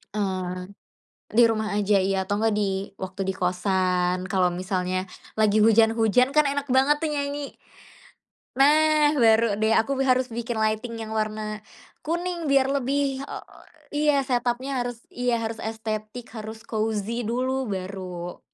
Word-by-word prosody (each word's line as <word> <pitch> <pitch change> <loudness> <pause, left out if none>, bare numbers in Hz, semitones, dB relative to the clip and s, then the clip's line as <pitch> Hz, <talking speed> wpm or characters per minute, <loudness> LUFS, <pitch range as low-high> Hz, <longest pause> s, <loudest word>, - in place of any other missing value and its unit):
eee, 185 -2 -3 0.6
di 235 +3 +5
rumah 220 -1 -1
aja 205 0 +2
iya 190 0 +1
atau 205 - 0
enggak 220 0 +1
di 195 -1 -2
waktu 190 +1 -5
di 190 - -1
kostan 180 0 0
kalau 185 -2 +2
misalnya 185 +1 -2 0.3
lagi 215 0 +4
hujan-hujan, 225 +2 +4
kan 300 - +6
enak 285 0 -2
banget 270 +3 +3
tuh 320 - -1
nyanyi. 285 -1 -3 1.0
Nah, 300 +1 +5
baru 225 -1 +4
deh 220 - +3
aku 225 +5 -1
be - - +3
harus 255 0 +3
bikin 235 0 -3
lighting 220 +2 -1
yang 220 0 -6
warna 215 0 -3 0.4
kuning 345 0 -2
biar 270 -1 +4
lebih, 275 0 0
eee - - -7 0.5
iya, 295 0 +3
setup-nya 250 +1 -1
harus 245 -1 -5
iya 245 -1 0
harus 225 0 -4
estetik, 220 +1 -5
harus 220 0 -7
cozy 220 +1 -2
dulu, 255 +3 -1
baru. 185 -3 -5
220 Hz, 140 wpm, -25 LUFS, 195-260 Hz, 1.0 s, kan